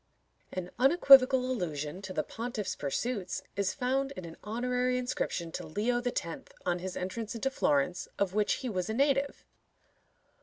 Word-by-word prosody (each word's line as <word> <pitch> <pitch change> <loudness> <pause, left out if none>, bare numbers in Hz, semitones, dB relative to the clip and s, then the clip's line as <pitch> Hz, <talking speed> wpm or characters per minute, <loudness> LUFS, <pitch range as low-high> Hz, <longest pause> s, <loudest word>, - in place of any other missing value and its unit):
An 180 -1 -5
unequivocal 270 -2 +7
allusion 175 - -3
to 190 -1 -7
the - - -1
pontiff's 230 -3 -4
pursuits 185 - -2
is 195 -1 0
found 270 +2 0
in 185 - -7
an 165 -1 -9
honorary 250 +3 0
inscription 215 -9 -2
to - - -5
Leo 235 +8 0
X. 245 - -1 0.4
on 175 0 +1
his 185 +1 -5
entrance 215 +5 -4
into 270 +4 -1
Florence, 165 - +1
of 195 -2 0
which 210 0 +2
he - - 0
was 185 -5 -2
a 220 - -1
native. 275 +1 +1
220 Hz, 155 wpm, -30 LUFS, 185-250 Hz, 0.4 s, unequivocal